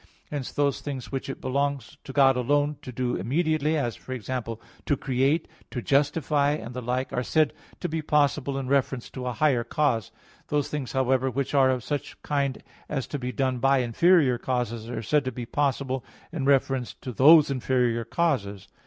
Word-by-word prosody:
Hence 145 -4 -4
those 145 -2 0
things 135 -4 -6
which 135 0 -4
it 135 - -5
belongs 140 -1 -2
to - - -6
God 135 -1 +5
alone 145 +4 +1
to 125 - -8
do 125 0 -1
immediately 155 - +1
as, 120 -6 -1
for 130 - -8
example, 115 -1 -4 0.3
to 145 - +2
create, 135 +5 +1 0.2
to 125 - -4
justify, 145 +1 +2
and 125 -5 -6
the 125 - -4
like 125 +3 -2
are 125 - 0
said 155 +3 +2 0.3
to - - -1
be 160 0 -2
possible 145 -2 +1
in 135 -1 -3
reference 135 -2 0
to 125 -1 -5
a 125 - -1
higher 130 -2 +2
cause. 115 -3 0 0.4
Those 145 -2 0
things, 145 -4 -4
however, 130 0 +2
which 135 +2 -2
are 135 -2 +5
of 130 -3 0
such 145 +1 -4
kind 140 -3 -1 0.3
as 135 -4 -2
to 145 - -3
be 125 0 -3
done 130 -2 -1
by 135 +2 +4
inferior 130 +2 +3
causes 120 -3 -2
are 115 -2 -4
said 145 +7 +2
to 130 - -1
be 120 0 -6
possible 135 0 -1 0.3
in 155 -5 -3
reference 135 -2 +1
to 130 - -7
those 145 +5 +7
inferior 125 -3 +1
causes. 105 - -1
135 Hz, 190 wpm, -26 LUFS, 125-145 Hz, 0.4 s, those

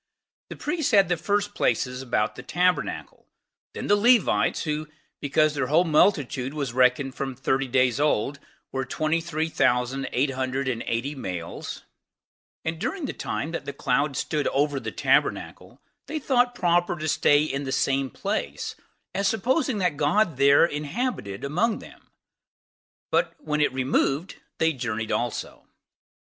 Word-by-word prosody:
The - - -7
priests 305 -5 -2
had 195 -4 +5
the 175 - +3
first 205 +4 -1
places 125 -8 0
about 120 -5 0
the - - -9
tabernacle; 180 0 -1 0.5
then - - -4
the 205 - +4
Levites, 235 +1 +3
who, 155 0 -2 0.3
because 155 +1 +2
their 140 -3 -1
whole 155 +6 +4
multitude 150 -5 +2
was 140 -5 -3
reckoned 130 +1 +3
from 135 -1 -4
thirty 135 +1 0
days 130 0 +2
old, 140 -1 +1 0.3
were 135 0 -2
twenty 155 +5 0
three 160 -1 -2
thousand 130 -2 +1
eight 135 +3 +1
hundred 130 +1 -2
and 120 -3 -1
eighty 120 +5 -1
males; 90 - -6 0.8
and 160 0 -2
during 295 - -2
the - - -4
time 155 - -3
that 170 - -4
the 140 - -5
cloud 135 +1 0
stood 150 -2 -1
over 145 0 +1
the - - -5
tabernacle, - - 0 0.3
they 315 - -3
thought 250 -4 +2
proper 175 -3 +2
to 155 -2 -4
stay 145 -1 +4
in 140 -2 -2
the 135 - -3
same 135 0 +1
place, - - -3 0.4
as 195 +1 +1
supposing 250 - +1
that 180 -6 0
God 160 +2 +2
there 140 +3 +6
inhabited 150 - -3
among 180 +11 +1
them; - - -14 1.0
but - - +1
when 150 - -2
that 150 - +3
removed, 135 +5 0 0.2
they 160 0 +2
journeyed 120 -4 -3
also. 120 -2 -3
145 Hz, 155 wpm, -25 LUFS, 130-175 Hz, 1.0 s, there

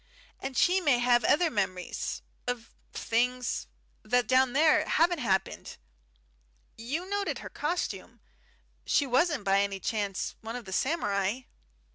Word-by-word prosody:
And 270 -1 -5
she 370 +2 +4
may 285 -7 +3
have 240 -1 +3
other 320 +7 +3
memories 185 -4 -3 0.2
of 245 -2 -4 0.2
things 245 +2 -1 0.3
that 245 0 +1
down 260 0 +3
there 310 +3 +4
haven't 340 +1 +2
happened. 195 -7 -1 1.0
You 285 +11 -4
noted 405 0 -1
her - - -8
costume. 345 +4 -3 0.6
She 285 - +2
wasn't 270 - +2
by 195 0 +3
any 200 -1 -2
chance 200 -2 -2
one 225 +1 -6
of 245 -2 -6
the 190 - -7
samurai?" 205 - 0
245 Hz, 130 wpm, -29 LUFS, 210-300 Hz, 1.0 s, she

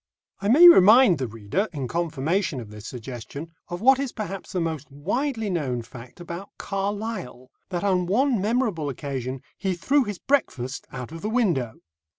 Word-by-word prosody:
I 200 - -2
may 305 +11 +9
remind 220 - +8
the 130 - -1
reader, 115 - -2
in 140 -5 -4
confirmation 165 0 -1
of 110 -3 -9
this 105 +1 -9
suggestion, 130 +5 -8 0.2
of 175 0 -6
what 265 +3 +6
is 275 -3 -2
perhaps 195 -3 -6
the 185 - -1
most 160 -4 -3
widely 220 - -2
known 140 -10 -2
fact 120 +5 -12
about 175 +3 -7
Carlyle, 195 - -4 0.2
that 180 -1 -3
on 185 -3 +1
one 240 +2 +2
memorable 210 - 0
occasion 130 -1 -4 0.2
he 190 -2 -1
threw 275 +11 +2
his 205 -4 -5
breakfast 135 - -1
out 125 +1 -7
of 165 0 -8
the 215 - -2
window. 170 - +1
175 Hz, 165 wpm, -25 LUFS, 130-215 Hz, 0.2 s, may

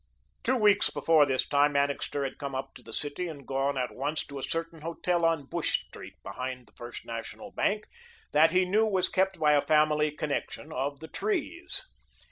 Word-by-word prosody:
Two 260 - +2
weeks 205 -10 +5
before 155 -1 +4
this 130 -1 +1
time, 145 0 +3
Annixter 140 0 0
had 135 - -4
come 140 -2 -4
up 135 +1 -4
to - - -13
the 115 - -12
city 145 +8 +1
and 155 -4 -7
had - - -19
gone 135 +1 0
at 125 -1 -1
once 145 +4 -2
to 140 -1 -7
a - - -6
certain 165 +2 -3
hotel 170 +2 -1
on 165 -4 +2
Bush - - -1
Street, - - -11
behind 130 -1 -5
the - - -22
First 120 0 -8
National 115 - -6
Bank, 210 -2 0 0.5
that 155 +2 +6
he 185 +2 +3
knew 215 +4 +3
was 190 -3 +2
kept 190 0 +1
by 150 -1 +4
a 145 -1 +5
family 150 0 +3
connection 150 +1 -4
of 140 +3 -2
the 160 - -7
Trees. 365 - -3
150 Hz, 200 wpm, -29 LUFS, 140-170 Hz, 0.5 s, that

